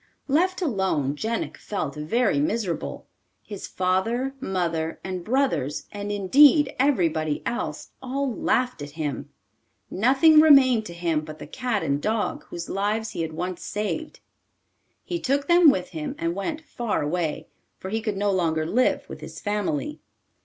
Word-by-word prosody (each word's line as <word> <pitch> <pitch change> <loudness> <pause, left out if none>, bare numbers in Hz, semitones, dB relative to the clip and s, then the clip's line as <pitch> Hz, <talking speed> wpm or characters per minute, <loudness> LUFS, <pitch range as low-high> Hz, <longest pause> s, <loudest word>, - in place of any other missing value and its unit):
Left 365 +6 +1
alone, 190 - 0
Jenik 225 +8 -3
felt 155 -9 -4
very 195 - +1
miserable. 230 - -2 0.4
His 205 -3 -7
father, 225 +9 0
mother, 170 -8 -2
and 185 -2 -4
brothers, 175 - 0
and, 205 0 -5
indeed, 275 - +5
everybody 165 - +1
else, 240 +1 -4
all 265 0 -2
laughed 250 -4 0
at 145 - -6
him. 150 -4 -3 0.6
Nothing 275 - +5
remained 265 -7 +6
to 170 - -9
him 170 -3 0
but 155 0 -9
the - - -8
cat 245 -5 -2
and 140 +1 0
dog 215 +2 -1
whose 170 0 -7
lives 215 +3 -1
he 180 -5 -4
had 160 -1 -3
once 180 +2 -4
saved. 215 +10 -4 0.8
He 345 - -3
took 280 0 0
them 345 -2 +7
with 185 -10 0
him 155 -3 -5
and 165 +1 -1
went 300 - -3
far 235 - -2
away, 160 0 -2 0.3
for 190 - -7
he 220 +1 -1
could 215 -3 -2
no 205 0 +1
longer 160 -4 +1
live 245 +10 +1
with - - -9
his - - -8
family. 205 - -2
205 Hz, 155 wpm, -25 LUFS, 170-255 Hz, 0.8 s, them